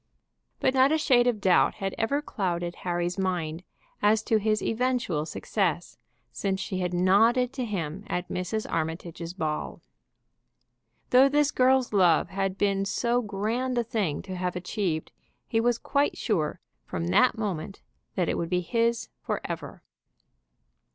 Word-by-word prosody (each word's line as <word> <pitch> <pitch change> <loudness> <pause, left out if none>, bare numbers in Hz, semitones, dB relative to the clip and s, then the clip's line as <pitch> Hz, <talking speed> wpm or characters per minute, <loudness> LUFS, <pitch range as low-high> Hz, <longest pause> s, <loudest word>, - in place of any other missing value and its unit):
But 260 - +2
not 265 +1 +5
a 315 - +3
shade 250 -5 +4
of 235 -4 +1
doubt 190 -3 +3
had 195 -1 -3
ever 280 +7 0
clouded 175 - -2
Harry's 175 +1 -2
mind 175 -3 -2 0.4
as 215 +1 +3
to 220 -2 +2
his 215 +1 0
eventual 230 -10 0
success - - -2 0.3
since 195 -1 -2
she 190 -1 -3
had 180 -1 -1
nodded 225 +8 +3
to 260 -2 -3
him 190 -3 -4
at 180 0 -2
Mrs. 185 +5 -3
Armitage's 165 +1 -4
ball. 155 -4 -3 1.3
Though 260 +2 +7
this 290 0 +2
girl's 255 -2 +3
love 180 -5 +4
had 195 0 -2
been 195 -1 +1
so 235 +5 0
grand 230 +5 -2
a 240 - +2
thing 210 - -2
to 185 - -6
have 180 0 -2
achieved, 180 -3 -2 0.3
he 225 - +1
was 240 0 +2
quite 285 +3 0
sure 165 -10 -1 0.2
from 85 - -4
that 90 - +4
moment 195 -3 -4 0.3
that 180 -3 +1
it - - -1
would 165 - -2
be 180 0 +1
his 230 +4 0
forever. - - -5
195 Hz, 150 wpm, -27 LUFS, 180-235 Hz, 1.3 s, Though